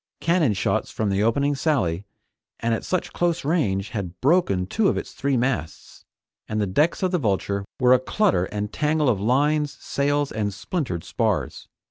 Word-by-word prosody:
Cannon 165 - +2
shots 95 - 0
from 105 -2 -1
the 100 +1 +1
opening 140 +6 +2
sally, 115 - 0 0.5
and 115 0 0
at 115 - -2
such 185 - -2
close 170 -4 0
range, 110 - 0
had 95 -4 -5
broken 135 - +2
two 205 - +1
of - - +1
its - - -5
three 140 -1 -1
masts, 120 -9 -3 0.4
and 110 - -2
the 105 - +1
decks 150 - +1
of 185 - +1
the 180 - +1
Vulture 100 -4 -1 0.2
were 125 0 +5
a 130 - +5
clutter 175 - +1
and 105 +1 -4
tangle 150 -2 +1
of 105 -5 +1
lines, 145 +5 +1
sails 145 0 0
and 105 -2 -2
splintered 110 - -3
spars. - - -2
125 Hz, 175 wpm, -24 LUFS, 100-150 Hz, 0.5 s, were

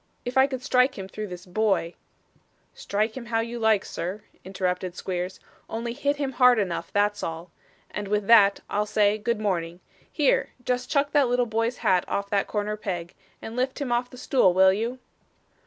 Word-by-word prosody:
If 245 +1 -4
I 265 +1 +6
could 260 -2 -5
strike 255 0 +2
him 190 -1 -6
through 215 +2 -6
this 180 -2 -9
boy 190 -3 0 0.4
' - - -39
'Strike 215 +2 -2
him 245 -3 -7
how 225 -1 +1
you 235 +1 -5
like, 220 -3 +3
sir,' 185 +5 -5 0.2
interrupted 185 -1 -2
Squeers, 180 0 -4 0.3
'only 230 +1 -3
hit 285 +2 0
him 280 -2 -2
hard 250 -1 +5
enough, 190 -5 -2
that's 205 0 +1
all 165 +1 -5 0.4
and 205 -1 -4
with 205 0 0
that, 200 -3 +6
I'll 210 +1 -1
say 210 0 +2
good 235 +1 -1
morning. 175 -5 -2 0.3
Here! 295 -4 +1
just 250 0 -1
chuck 285 -1 +1
that 285 -3 +4
little 245 0 +2
boy's 230 +2 -1
hat 185 -1 +4
off 200 0 -3
that 200 -1 +1
corner 210 0 -2
peg, 175 -5 -5 0.3
and 225 - -7
lift 255 +3 -1
him 275 -4 -3
off 240 +1 0
the 250 - -13
stool 245 -8 +3
will 190 0 +6
you? 230 +5 -2
215 Hz, 190 wpm, -25 LUFS, 190-245 Hz, 0.4 s, I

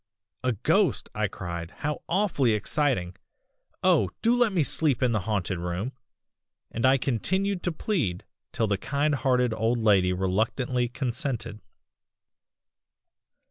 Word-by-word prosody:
"'A 125 -1 +2
ghost!' - - +2
I - - 0
cried, 85 -1 -6
'how 150 - -4
awfully 170 - +2
exciting! 105 -5 0 0.7
oh! 95 - +4
do 230 +2 +4
let 240 -3 +3
me 175 -5 +2
sleep 140 -3 +1
in 125 - +3
the 110 - +1
haunted 95 -4 -1
room,' 90 +8 -3 0.8
and 115 +3 +1
I 135 +1 +5
continued 185 - -1
to 175 - -1
plead 155 - -1 0.3
till 115 - 0
the 100 -2 0
kind 145 +5 0
hearted 125 -4 +2
old 110 +2 +1
lady 100 -5 +4
reluctantly 110 +7 0
consented. 120 -4 -3
120 Hz, 130 wpm, -27 LUFS, 100-145 Hz, 0.8 s, I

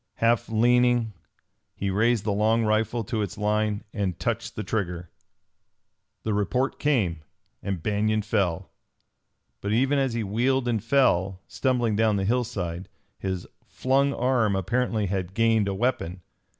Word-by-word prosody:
Half 115 -1 +1
leaning, 120 0 +3 0.6
he 100 -1 -2
raised 110 +2 +2
the 105 -2 0
long 110 +3 +2
rifle 110 +2 +1
to 110 +1 -2
its 100 0 -4
line 105 0 0
and 100 -5 -2
touched - - -2
the 110 - -3
trigger. 90 -4 -3 1.1
The 110 - -1
report 125 +6 0
came; 105 - +1 0.4
and 95 -5 -4
Banion 105 +1 +1
fell. 100 -6 -1 0.9
But 100 +1 -1
even 135 +5 +2
as 135 -3 0
he 115 - -1
wheeled 125 +5 +1
and 115 -4 0
fell, 95 -8 +2
stumbling 120 -5 0
down 110 -1 +3
the 95 -1 0
hillside, 100 -7 -2 0.3
his 95 -2 -3 0.2
flung 135 +2 +1
arm 120 -6 +1
apparently 110 +3 0
had 95 -1 -3
gained 115 -2 +3
a 100 - -1
weapon. 95 -6 -1
110 Hz, 140 wpm, -26 LUFS, 100-120 Hz, 1.1 s, leaning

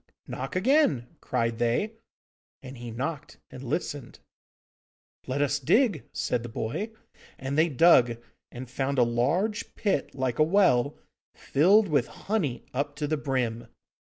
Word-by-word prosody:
'Knock 135 +5 -6
again!' 185 - +2
cried 115 -1 -1
they. 120 - 0 0.7
And 130 -1 -9
he 120 0 -7
knocked 140 +6 -5
and 130 0 -9
listened. 140 -1 -4 1.1
'Let 135 +3 0
us 145 0 0
dig,' 175 - +2
said 125 - -1
the 120 - -7
boy. 115 - -3 0.5
And 135 +1 -4
they 160 +2 +3
dug, 130 -6 +5 0.3
and 125 +1 -8
found 135 +2 -2
a 125 - +6
large 145 - 0
pit 200 -9 -1
like 130 -2 -2
a - - +7
well, 155 -7 +3 0.4
filled 195 +9 +4
with 145 -7 +1
honey 185 - -3
up 145 +2 -2
to 150 +1 -2
the 155 +2 0
brim. 125 -5 -2
140 Hz, 140 wpm, -27 LUFS, 120-165 Hz, 1.1 s, a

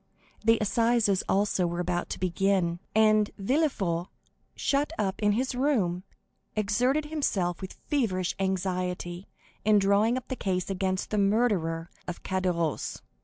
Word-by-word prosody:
The 225 +1 +5
assizes, 225 -2 +2
also, 195 -2 +2
were 175 +1 -3
about 175 0 -1
to - - -4
begin, 185 -1 +1 0.2
and 215 -1 +4
Villefort, 195 - 0 0.5
shut 285 +2 0
up 195 -1 -1
in 205 -1 +3
his 255 +5 0
room, 240 -10 +1 0.5
exerted 245 +8 +1
himself 200 - -1
with 190 - -6
feverish 190 -11 0
anxiety 180 -1 -2 0.4
in 215 0 +5
drawing 205 +4 +3
up 255 - -6
the 260 - -3
case 185 -4 -2
against 190 0 -1
the 210 - +1
murderer 195 -6 +1 0.2
of 180 - -6
Caderousse. 180 -5 -1
195 Hz, 130 wpm, -28 LUFS, 180-225 Hz, 0.5 s, The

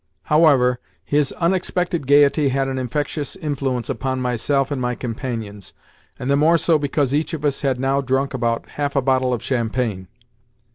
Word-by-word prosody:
However, 140 -6 +4 0.3
his 145 -2 +1
unexpected 175 -3 -1
gaiety 145 0 +4
had 135 +1 0
an 130 -1 -2
infectious 145 +4 -3
influence 135 - -2
upon 130 -1 -2
myself 130 +3 0
and 135 -3 -2
my 125 0 -1
companions, 115 -5 -5 0.4
and 125 - -5
the 140 - +3
more 160 +4 +4
so 165 -1 +2
because 145 -2 0
each 155 +3 0
of 150 -1 -5
us 140 -2 0
had 135 -3 0
now 135 +1 +1
drunk 135 +1 -1
about 115 -2 -1
half 145 -1 -3
a 140 - +3
bottle 130 -1 +2
of 120 -2 -2
champagne. 115 -6 -2
135 Hz, 165 wpm, -21 LUFS, 125-145 Hz, 0.4 s, However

